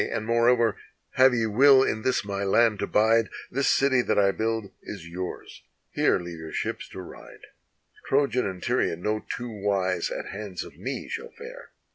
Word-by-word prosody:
and 115 -1 -3
moreover, 115 0 +3 0.4
have 130 +1 +5
ye 115 -2 +1
will 130 +5 +6
in 110 - -1
this 125 -3 0
my 100 -1 -3
land 105 +1 +3
to - - -2
bide, 110 +1 +3 0.2
This 135 +2 0
city 130 -2 +3
that - - 0
I 100 -1 +4
build 110 -1 -2
is 95 -6 -8
yours: 90 +1 -7 0.3
here - - +2
leave 85 -1 -8
your 80 -1 -8
ships - - -4
to 95 - -8
ride: 90 - -12 0.7
Trojan 135 -4 +1
and 95 -2 -6
Tyrian 85 +2 0
no 110 0 -1
two 120 0 -6
wise 95 -4 -1
at - - -5
hands 100 -3 -6
of - - -13
me - - -5
shall 460 0 -5
fare. - - -11
110 Hz, 180 wpm, -26 LUFS, 100-125 Hz, 0.7 s, will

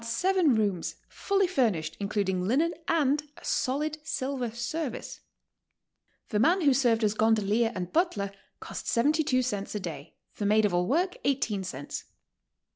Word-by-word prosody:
J 230 - -8
seven 345 +3 +3
rooms, 200 -6 0
fully 395 -1 +1
furnished 220 - 0
including 195 -3 -1
linen 310 +9 +2
and 295 -3 +2 0.2
a - - -13
solid 295 +3 -1
silver 265 -4 -2
service. 240 +4 -4 1.1
The 210 - 0
man 345 - +4
who 285 -4 +5
served 240 -4 +2
as 210 -1 +3
gondolier 220 +1 +2
and 180 -1 -4
butler 275 - +1 0.3
cost - - -7
72 285 +1 +2
cents 205 -5 -3
a - - -1
day; 160 -5 -7 0.2
the 205 - -1
maid 215 +1 +4
of 200 - 0
all 175 0 +1
work, 355 +8 +1
18 235 -8 0
cents. 145 -6 -6
235 Hz, 150 wpm, -28 LUFS, 205-300 Hz, 1.1 s, who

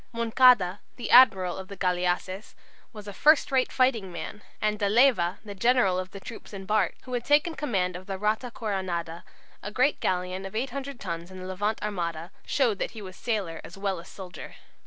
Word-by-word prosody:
Moncada, 230 -5 +4 0.2
the 240 - -5
admiral 190 -8 +6
of 190 - -8
the 200 - -9
galleasses, 180 +2 -1 0.4
was 210 -3 -11
a 205 - -6
"first 300 +9 +4
rate 260 -1 +2
fighting 240 -8 +1
man," 175 +5 -7 0.2
and 210 0 0
De 200 -2 +1
Leyva, 210 -6 +4
the 205 - -7
general 200 -3 +3
of 185 0 -5
the 195 - -9
troops 220 0 -10
embarked, 195 -1 -1
who 255 - -8
had 240 -1 -1
taken 295 +5 +3
command 195 - -1
of 185 +1 -9
the 195 -1 -3
"Rata 215 +5 0
Coronada," 185 -7 -3 0.4
a 205 - -5
great 255 +7 +1
galleon 185 +1 -1
of 195 +2 -8
800 270 +2 -4
tons 170 -2 -5
in 185 - -10
the 185 - -7
Levant 205 +4 -2
armada, 170 -4 -3 0.2
showed 235 -8 +1
that - - -4
he - - -6
was 185 -1 -9
sailor 200 -8 -3
as 175 - -11
well 195 -2 -2
as 170 - -12
soldier. 190 -2 -10
200 Hz, 195 wpm, -27 LUFS, 185-235 Hz, 0.4 s, admiral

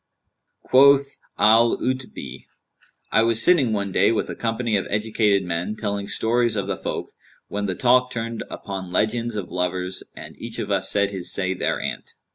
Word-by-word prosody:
Quoth 140 +1 +4 0.2
Al 115 +3 +5
'Utbν[FN#190], 125 - -5 0.7
"I - - +4
was 115 0 +2
sitting 140 -4 +4
one 100 -2 -2
day 95 +4 +3
with 115 - -1
a - - -6
company 115 -1 -1
of 95 - -1
educated 105 -1 +1
men, 90 +4 -3
telling 100 -2 -3
stories 120 +2 +1
of 100 -2 -1
the 100 - -2
folk, - - -5 0.4
when 100 0 -2
the 95 - -2
talk 125 +2 +3
turned 115 -1 -4
upon 95 -3 -6
legends 115 +4 0
of 100 -4 -5
lovers 90 +1 -2
and - - -10
each - - -7
of - - -4
us - - +2
said 100 0 +2
his 95 -3 -2
say 95 -1 0
thereanent. 90 - -3
105 Hz, 170 wpm, -23 LUFS, 95-115 Hz, 0.7 s, Al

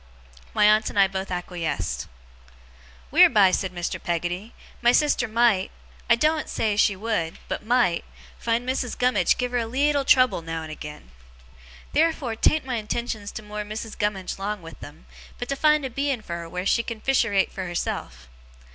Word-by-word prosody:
My - - +5
aunt 215 +1 +4
and - - -8
I 195 -1 +6
both 190 0 -5
acquiesced. 175 - -3 1.0
'Wheerby,' 200 -5 +6
said 190 -2 0
Mr. 175 -1 -4
Peggotty, 175 +5 -3 0.3
'my 240 0 +5
sister 290 -4 +2
might 220 -4 +2 0.4
I 235 - +7
doen't 310 +5 +1
say 215 -2 0
she 205 -1 +3
would, 195 -5 -2
but - - -4
might 235 -6 +2 0.4
find 235 +1 0
Missis 255 -1 -2
Gummidge 245 -8 +2
give 250 -1 -2
her 245 - +1
a 230 - -2
leetle 280 +4 +1
trouble 255 -9 +4
now 165 0 -5
and 155 - -8
again. 150 - -9 0.8
Theerfur 305 -6 +1
'tan't 305 +5 +2
my 255 -2 -2
intentions 215 -1 -3
to 215 - -7
moor 210 0 -5
Missis 215 +1 -6
Gummidge 195 -3 -2
'long 200 -1 -3
with 165 0 -11
them, 150 +3 -12 0.3
but 245 - -5
to 275 - 0
find 300 0 +3
a - - -3
Beein' 275 -2 -1
fur 170 -3 -5
her 170 -1 -8
wheer 180 +2 -4
she 235 - +3
can 230 -1 -6
fisherate 225 -6 +2
for 190 -2 -5
herself. 65 - -4
215 Hz, 175 wpm, -24 LUFS, 180-245 Hz, 1.0 s, I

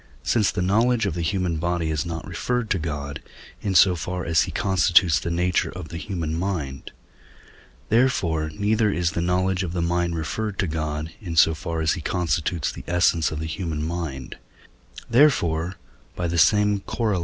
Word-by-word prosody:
since 105 - +2
the 90 - -2
knowledge 115 +5 +2
of - - -1
the 85 - -3
human 85 0 -1
body 85 0 -1
is 75 +1 -2
not 80 -2 -5
referred 115 +7 -2
to 95 - +2
God, 75 -3 -4 0.4
in 100 -2 -2
so 90 +1 +6
far 90 +2 -4
as 85 -1 +3
he - - -5
constitutes 90 -5 +3
the - - -4
nature 90 +1 +1
of 90 -4 -8
the 85 - -6
human 85 -7 -3
mind; 80 -6 -3 1.0
therefore, 90 -10 +2
neither 105 +4 +1
is 85 -2 0
the 85 - -2
knowledge 90 +2 +1
of 90 -2 -3
the 90 - -2
mind 85 0 0
referred 95 +6 -3
to 95 - +1
God, 80 -1 -3
in 85 -5 -5
so 80 0 +6
far 80 +1 -4
as 80 - +2
he 85 - -5
constitutes 85 -2 -1
the - - -9
essence 85 -2 +2
of 75 - -5
the 80 - -3
human 80 -2 -3
mind; 80 -6 -5 0.7
therefore 90 - +3 0.4
(by 90 - -3
the 85 0 0
same 105 +5 +4
Coroll. 105 -1 -1
85 Hz, 180 wpm, -24 LUFS, 80-95 Hz, 1.0 s, so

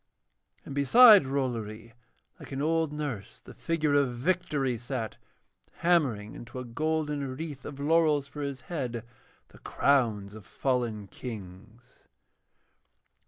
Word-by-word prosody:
And - - -7
beside 205 - +8
Rollory, 115 -4 -3 0.5
like - - -11
an 135 - -4
old 160 +1 +1
nurse, 145 -9 -5
the - - -13
figure 155 -3 -1
of 140 -4 +2
Victory 145 -4 0
sat, 115 -1 -5 0.6
hammering 140 -12 +1
into 120 +2 -10
a 125 - -5
golden 150 +1 -2
wreath 150 -4 -7
of 140 -1 -8
laurels 150 -1 +2
for 150 - -8
his 140 -2 -4
head 125 -9 -4 0.4
the - - -17
crowns 110 -8 +1
of 110 -1 -10
fallen 120 -3 -2
Kings. 110 +2 -11
135 Hz, 120 wpm, -28 LUFS, 115-150 Hz, 0.6 s, beside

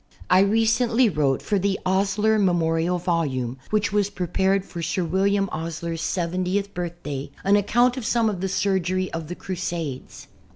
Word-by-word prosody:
I 185 - +7
recently 225 +4 +3
wrote 145 -6 0
for 205 - 0
the 195 0 0
"Osier 200 +3 +2
Memorial 175 -2 +1
Volume," 140 -8 -1
which 215 0 0
was 205 -1 +2
prepared 190 +1 0
for 170 - -7
Sir 165 +3 -1
William 195 +4 +1
Osier's 165 0 -4
seventieth 185 +4 -1
birthday, 165 -6 -5
an 195 +1 +4
account 240 +5 +3
of 250 - -4
some 230 -2 +2
of 195 -4 -2
the 190 - -1
surgery 185 -1 0
of 165 -2 -4
the 175 - -5
Crusades. 165 -7 -5
185 Hz, 155 wpm, -24 LUFS, 165-200 Hz, -, I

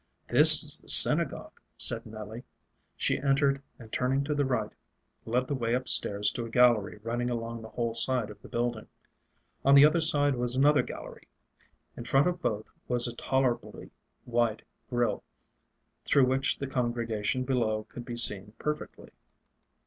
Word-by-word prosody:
"This - - +9
is - - +6
the - - -11
synagogue," - - +5 0.2
said - - +1
Nelly. 110 +2 -10 0.5
She - - -2
entered, 140 0 0 0.2
and 115 -2 -15
turning 135 +2 -1
to 150 +1 -4
the 145 -1 -1
right, 130 -1 -3 0.5
led 125 +3 -2
the 145 - -5
way 120 -3 -2
up 130 +1 -5
stairs 105 +1 +1
to 120 - -6
a 115 - -9
gallery 115 -4 +1
running 120 +2 -4
along 115 -1 -6
the 110 - -12
whole 115 0 -4
side 115 -1 -1
of 105 0 -16
the - - -14
building. 120 -2 -4 0.8
On 140 +1 +4
the 140 +1 +7
other 160 +2 +1
side 145 -3 +4
was 125 0 -2
another 145 +2 +2
gallery. - - -11 0.7
In - - -9
front 135 +3 +1
of 180 -1 -3
both 110 -6 -4 0.2
was 125 0 +2
a 120 - -8
tolerably 130 -1 -4 0.3
wide 120 -2 -2 0.3
grill, 120 -1 -2 0.8
through 140 -2 +2
which 130 +1 -1
the 140 - -6
congregation 120 -2 -4
below 115 -5 -2
could 120 - -12
be 120 0 -9
seen 105 -3 -1
perfectly. 150 +3 -7
120 Hz, 165 wpm, -27 LUFS, 115-135 Hz, 0.8 s, This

